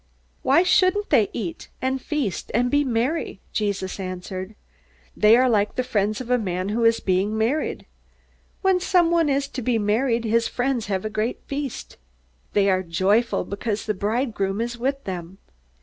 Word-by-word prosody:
"Why 340 - +4
shouldn't 370 +2 +3
they 230 -8 +4
eat 185 -7 -5
and 260 0 -1
feast 280 - -2
and 245 +2 +2
be 290 0 +3
merry?" 250 -1 -1
Jesus 200 -3 -2
answered. 185 +2 -6 0.6
"They 215 +2 +6
are 255 +1 +4
like 210 -4 +1
the 255 - 0
friends 215 -4 0
of 250 -1 -5
a 250 - +4
man 185 -2 -2
who 230 +3 0
is 230 0 +4
being 195 +3 0
married. 240 +8 -1 0.8
When 380 -1 +4
someone 340 -3 +3
is 275 0 +1
to 260 - -5
be 240 0 +1
married, 230 +3 +1
his 230 +1 +2
friends 245 -3 -1
have 195 0 -2
a - - -1
great 220 +3 -2
feast. 280 -2 -5 0.6
They 200 -1 +3
are 185 -1 +3
joyful 190 +7 +1
because 205 +1 -3
the 215 - 0
bridegroom 205 -1 -1
is 235 +1 -2
with 270 +3 -2
them. 180 -1 -6
230 Hz, 165 wpm, -23 LUFS, 200-265 Hz, 0.8 s, They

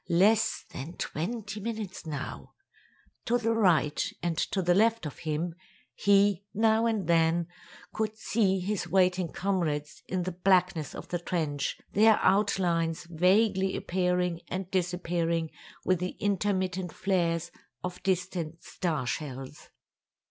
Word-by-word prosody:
"Less 205 +6 +3
than 145 +6 -6
twenty 210 +5 -4
minutes 210 -5 -5
now." 145 -3 -6 0.7
To 240 - +2
the 230 -1 0
right 170 -9 +3 0.2
and 170 -1 0
to 190 +3 -1
the 175 +1 +4
left 225 +1 +3
of 150 - -6
him, 160 +2 -2 0.4
he, 200 -1 +3
now 220 +1 +3
and 220 -5 0
then, 165 0 +3 0.5
could 215 0 -2
see 200 -3 +1
his 185 -1 -2
waiting 180 -2 +2
comrades 155 -6 -2
in 185 -1 -1
the 185 - -2
blackness 180 -3 +2
of - - -8
the 175 - -1
trench, 155 -5 -2
their 220 +1 +5
outlines 180 -5 +2
vaguely 190 +3 +3
appearing 180 -1 0
and 185 +1 -4
disappearing 170 -2 0 0.3
with 185 -2 +2
the 180 +1 -4
intermittent 190 -3 0
flares 175 -3 0 0.3
of 180 0 -5
distant 180 -3 -2
star 155 -8 -2
shells. 135 +1 -5
180 Hz, 125 wpm, -29 LUFS, 165-200 Hz, 0.7 s, their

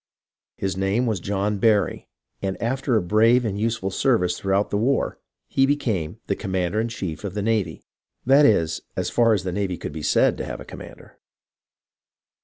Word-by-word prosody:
His 95 -2 -2
name 95 +6 0
v^as 110 -7 -1
John 100 +1 -1
Barry, 105 -2 +1 0.3
and 95 -1 -3
after 130 +2 0
a 105 - +2
brave 115 +6 +4
and 100 -2 -2
useful 110 -3 -1
service 90 -6 +2
throughout 95 +1 0
the 100 - +1
war, 130 +6 0 0.3
he 135 0 +2
became 110 - -1
the 100 - -1
"commander 95 +1 -1
in 115 - -1
chief 95 -8 -5
of 100 -2 -5
the 105 - -2
navy"; 110 -2 -1 0.4
that 135 +4 +6
is, 85 -7 +1
as - - -2
far 115 -2 +4
as 95 - -2
the 95 - -3
navy 95 -1 -2
could 75 - -6
be 80 - -6
said - - +2
to - - -2
have - - -6
a - - -9
commander. - - -12
105 Hz, 185 wpm, -23 LUFS, 95-115 Hz, 0.4 s, that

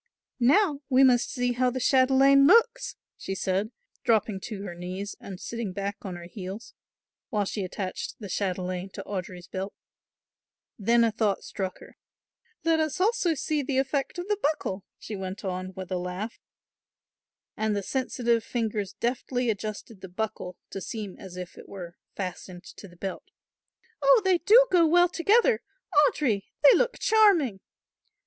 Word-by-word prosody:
"Now 290 - +3
we 260 0 +5
must 245 -2 +4
see 245 -1 0
how 250 +1 +2
the 255 +1 -3
chatelaine 270 +2 +5
looks," 465 +4 +4 0.2
she 195 - -4
said, 190 +3 -1 0.3
dropping 215 -3 +2
to 205 -4 -6
her 185 -4 -6
knees 185 +3 -6
and 190 -2 -9
sitting 230 -5 -4
back 200 +1 -3
on 185 -3 -6
her 175 - -9
heels, 195 +4 -8 0.6
while 210 -2 0
she 200 +1 -3
attached 185 +1 -4
the 210 - -8
chatelaine 185 -1 -2
to 195 - -6
Audry's 180 -3 -6
belt. 190 +2 -5 1.0
Then 235 +3 +4
a 230 - +3
thought 210 -3 0
struck 190 -2 -4
her. - - -15 0.7
"Let 325 -1 +3
us 310 0 -1
also 380 -4 +2
see 300 +1 -1
the 275 -1 -2
effect 270 +3 -1
of 350 +1 -4
the 415 -1 0
buckle," 285 -10 -1
she 215 - -7
went 190 +1 -6
on 185 0 -3
with 190 0 -7
a 185 - 0
laugh, 180 +5 -5 1.2
and 215 -1 0
the 200 - -2
sensitive 240 -2 0
fingers 215 -4 -2
deftly 245 +2 -1
adjusted 210 0 -6
the 190 - -8
buckle 180 -2 -4
to 195 - -5
seem 210 -1 -5
as 185 -2 -10
if 180 -1 -8
it - - -13
were 175 -3 -8 0.2
fastened 185 -1 -6
to 200 - -10
the 175 -1 -18
belt. 190 +1 -6 0.7
"Oh, 275 +4 +6
they 370 -2 +4
do 460 +8 +7
go 345 -3 +5
well 350 +2 +5
together! 440 +7 +3 0.5
Audry, 215 -10 0 0.2
they 285 - +9
look - - +1
charming!" 375 - +4
220 Hz, 160 wpm, -27 LUFS, 190-275 Hz, 1.2 s, they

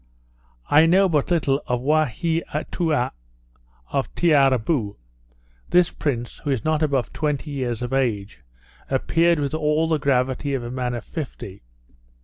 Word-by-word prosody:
I 155 +3 +5
know 190 +3 +5
but 150 -3 0
little 145 -5 +1
of 125 -1 0
Waheatoua 155 +1 0 0.8
of 135 - -2
Tiarrabou. 135 -7 +2 0.7
This 175 0 +4
prince, 120 -5 -3
who - - -5
is 135 -2 -1
not 155 0 +1
above 140 -7 0
twenty 150 -1 -2
years 125 -4 -3
of 120 +2 -4
age, 110 - -1 0.5
appeared 165 +5 +2
with 145 0 -2
all 155 +1 +1
the 160 -2 +1
gravity 135 0 0
of 125 - -3
a 120 - -6
man 125 -1 -2
of 120 - -6
fifty. 130 - -7
140 Hz, 135 wpm, -23 LUFS, 125-155 Hz, 0.8 s, I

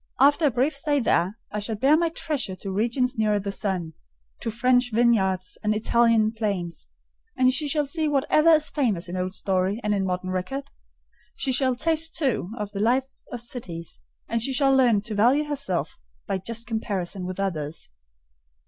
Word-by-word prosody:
After 290 +4 +5
a - - +4
brief 265 +5 0
stay 290 0 0
there, 195 -3 +1
I 210 - -2
shall 215 +2 -2
bear 270 +8 +4
my 335 +1 +2
treasure 295 - -2
to 195 +1 -6
regions 235 +4 0
nearer 210 -1 +2
the 200 0 -4
sun: 185 -5 -3 0.5
to - - -3
French 245 +2 +2
vineyards 195 -6 +1
and 215 0 +1
Italian 225 0 +3
plains; 200 -7 -3 0.5
and 255 0 +4
she 300 +2 0
shall 295 +1 +1
see 310 +2 -1
whatever 295 +3 +3
is 310 -3 +4
famous 220 - 0
in 175 - -5
old 185 +1 -2
story 190 +2 0
and 210 0 +1
in 200 -1 0
modern 185 0 -2
record: 270 +10 -4 0.6
she 270 - -1
shall 255 0 +2
taste, 325 +4 0
too, 265 - 0
of 210 -2 -4
the 200 - -5
life 255 +5 +1 0.2
of 245 -2 -4
cities; 180 -9 -7 0.3
and 230 0 -1
she 265 +4 0
shall 270 0 +4
learn 240 -6 +4
to 215 +1 -6
value 245 +8 +3
herself 280 - -2 0.3
by 190 - -2
just 230 +4 -5
comparison 200 -5 -3
with 185 +1 -6
others." 160 -6 -3
230 Hz, 180 wpm, -25 LUFS, 195-270 Hz, 0.6 s, After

